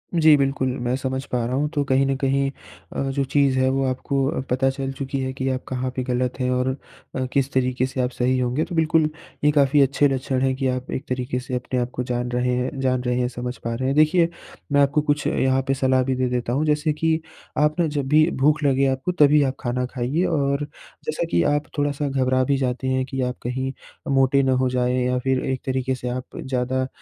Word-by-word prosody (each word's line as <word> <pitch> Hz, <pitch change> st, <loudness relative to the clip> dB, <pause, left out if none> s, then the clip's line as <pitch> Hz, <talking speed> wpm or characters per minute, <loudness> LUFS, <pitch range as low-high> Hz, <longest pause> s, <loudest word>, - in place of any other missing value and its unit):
जी, 155 Hz, -2 st, +6 dB
बिल्कुल 135 Hz, -1 st, 0 dB, 0.2 s
मैं 125 Hz, -, +1 dB
समझ 130 Hz, 0 st, -3 dB
पा 125 Hz, -2 st, 0 dB
रहा 125 Hz, +2 st, -2 dB
हूँ। 150 Hz, +2 st, +1 dB
तो 145 Hz, -, +1 dB
कहीं 135 Hz, +1 st, +3 dB
न 135 Hz, -, +1 dB
कहीं 135 Hz, 0 st, +1 dB, 0.5 s
अ, -, -, -1 dB
जो 140 Hz, 0 st, 0 dB
चीज़ 135 Hz, -1 st, +2 dB
है 130 Hz, 0 st, +3 dB
वो 135 Hz, 0 st, 0 dB
आपको 135 Hz, +2 st, -1 dB
पता 130 Hz, +2 st, +2 dB
चल 135 Hz, 0 st, -3 dB
चुकी 135 Hz, 0 st, -4 dB
है 130 Hz, 0 st, -2 dB
कि 135 Hz, 0 st, -3 dB
आप 130 Hz, 0 st, -2 dB
कहाँ 130 Hz, 0 st, -2 dB
पे 130 Hz, -, -1 dB
गलत 125 Hz, 0 st, -1 dB
हैं 125 Hz, 0 st, 0 dB
और 125 Hz, +1 st, +1 dB, 0.5 s
अ, 130 Hz, -, -1 dB
किस 140 Hz, -1 st, +1 dB
तरीके 130 Hz, 0 st, +1 dB
से 130 Hz, 0 st, -3 dB
आप 125 Hz, -, 0 dB
सही 125 Hz, +1 st, +1 dB
होंगे। 125 Hz, +4 st, 0 dB
तो 175 Hz, -, -6 dB
बिल्कुल 160 Hz, -1 st, +3 dB, 0.3 s
ये 150 Hz, -, +5 dB
काफ़ी 145 Hz, 0 st, +4 dB
अच्छे 140 Hz, +2 st, +3 dB
लक्षण 130 Hz, -1 st, -1 dB
हैं 135 Hz, 0 st, +2 dB
कि 135 Hz, -1 st, -1 dB
आप 130 Hz, 0 st, -3 dB
एक 140 Hz, -, -4 dB
तरीके 125 Hz, 0 st, -2 dB
से 125 Hz, 0 st, -8 dB
अपने 125 Hz, 0 st, -2 dB
आप 125 Hz, +1 st, -2 dB
को 125 Hz, -, -2 dB
जान 125 Hz, 0 st, -2 dB
रहे 125 Hz, 0 st, +1 dB
हैं 125 Hz, +2 st, -2 dB
जान 130 Hz, -1 st, +1 dB
रहे 125 Hz, 0 st, 0 dB
हैं, 125 Hz, -, +1 dB
समझ 125 Hz, 0 st, -5 dB
पा 115 Hz, 0 st, -4 dB
रहे 130 Hz, +2 st, -2 dB
हैं। 135 Hz, -, 0 dB
देखिए 165 Hz, +2 st, +4 dB, 0.4 s
मैं 145 Hz, 0 st, +4 dB
आपको 140 Hz, +2 st, +3 dB
कुछ 145 Hz, 0 st, 0 dB
यहाँ 130 Hz, 0 st, +2 dB
पे 135 Hz, -, +2 dB
सलाह 130 Hz, -1 st, +2 dB
भी 130 Hz, 0 st, -1 dB
दे 130 Hz, 0 st, 0 dB
देता 120 Hz, -1 st, -1 dB
हूँ, 145 Hz, +4 st, +1 dB
जैसे 150 Hz, 0 st, +1 dB
कि 160 Hz, +1 st, +1 dB, 0.4 s
आप 150 Hz, +2 st, +2 dB
न 165 Hz, -, +2 dB
जब 145 Hz, -2 st, -2 dB
भी 155 Hz, +3 st, +4 dB
भूख 150 Hz, +2 st, +3 dB
लगे 135 Hz, -1 st, +3 dB
आपको 135 Hz, +7 st, -1 dB
तभी 150 Hz, -3 st, +5 dB
आप 135 Hz, 0 st, -1 dB
खाना 125 Hz, +1 st, -1 dB
खाइए। 130 Hz, +7 st, -1 dB
और 140 Hz, -1 st, +1 dB, 0.4 s
जैसा 155 Hz, +2 st, -2 dB
कि -, -, +3 dB
आप 145 Hz, 0 st, +1 dB
थोड़ा-सा 145 Hz, 0 st, 0 dB
घबरा 130 Hz, -1 st, +1 dB
भी 140 Hz, +1 st, +1 dB
जाते 130 Hz, 0 st, -2 dB
हैं 130 Hz, 0 st, +1 dB
कि 135 Hz, 0 st, -4 dB
आप 125 Hz, 0 st, -2 dB
कहीं 130 Hz, +2 st, -2 dB, 0.4 s
मोटे 135 Hz, +1 st, +4 dB
ना 130 Hz, -, +2 dB
हो 130 Hz, -, +2 dB
जाएँ 125 Hz, 0 st, +1 dB
या 125 Hz, 0 st, +1 dB
फिर 130 Hz, 0 st, 0 dB
एक 130 Hz, -1 st, -2 dB
तरीके 130 Hz, 0 st, -1 dB
से 125 Hz, 0 st, -6 dB
आप 125 Hz, +1 st, -6 dB
ज़्यादा 130 Hz, 0 st, -1 dB
130 Hz, 240 wpm, -23 LUFS, 125-140 Hz, 0.5 s, जी